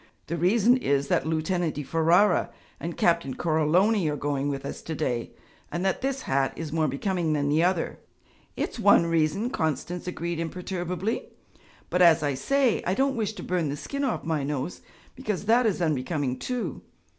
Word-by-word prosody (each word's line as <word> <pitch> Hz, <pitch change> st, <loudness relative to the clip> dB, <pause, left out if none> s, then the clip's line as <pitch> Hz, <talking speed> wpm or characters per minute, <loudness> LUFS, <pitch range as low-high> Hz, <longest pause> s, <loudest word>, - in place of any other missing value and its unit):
'The 170 Hz, -, -3 dB
reason 220 Hz, +8 st, +4 dB
is, 140 Hz, -, 0 dB
that 145 Hz, -, +1 dB
Lieutenant 160 Hz, +1 st, 0 dB
di 150 Hz, -, -3 dB
Ferara 165 Hz, +6 st, +3 dB, 0.3 s
and 170 Hz, 0 st, -5 dB
Captain 170 Hz, -6 st, +2 dB
Coroloni 170 Hz, +4 st, +2 dB
are 150 Hz, -, -1 dB
going 145 Hz, -1 st, -1 dB
with 140 Hz, -1 st, -4 dB
us -, -, -6 dB
to 160 Hz, -, -5 dB
day, 125 Hz, -6 st, -2 dB, 0.4 s
and 175 Hz, +2 st, -2 dB
that 190 Hz, -, 0 dB
this 270 Hz, 0 st, -2 dB
hat 135 Hz, 0 st, +1 dB
is 160 Hz, -2 st, -5 dB
more 160 Hz, -1 st, +2 dB
becoming 165 Hz, +3 st, -1 dB
than 145 Hz, -1 st, 0 dB
the 155 Hz, +3 st, +3 dB
other.' 180 Hz, -2 st, 0 dB, 0.6 s
'It's -, -, -3 dB
one 200 Hz, -5 st, +6 dB
reason,' 165 Hz, +8 st, +1 dB
Constance 165 Hz, +3 st, -2 dB
agreed 170 Hz, -1 st, -3 dB
imperturbably, 180 Hz, +4 st, -3 dB, 0.6 s
'but, 180 Hz, -, +2 dB
as 165 Hz, -3 st, +6 dB
I 145 Hz, -1 st, +1 dB
say, 260 Hz, -, +1 dB
I 185 Hz, -, +1 dB
don't 270 Hz, +3 st, +1 dB
wish 220 Hz, -2 st, -1 dB
to -, -, -8 dB
burn 175 Hz, -4 st, -1 dB
the 145 Hz, -, -3 dB
skin 280 Hz, -, -4 dB
off 265 Hz, -, -1 dB
my 160 Hz, -3 st, -1 dB
nose, 145 Hz, +3 st, -3 dB, 0.3 s
because 215 Hz, -7 st, -3 dB
that 230 Hz, +2 st, +4 dB
is 185 Hz, -4 st, 0 dB
unbecoming 145 Hz, -3 st, -1 dB
too. 235 Hz, -, -3 dB
170 Hz, 180 wpm, -26 LUFS, 150-195 Hz, 0.6 s, one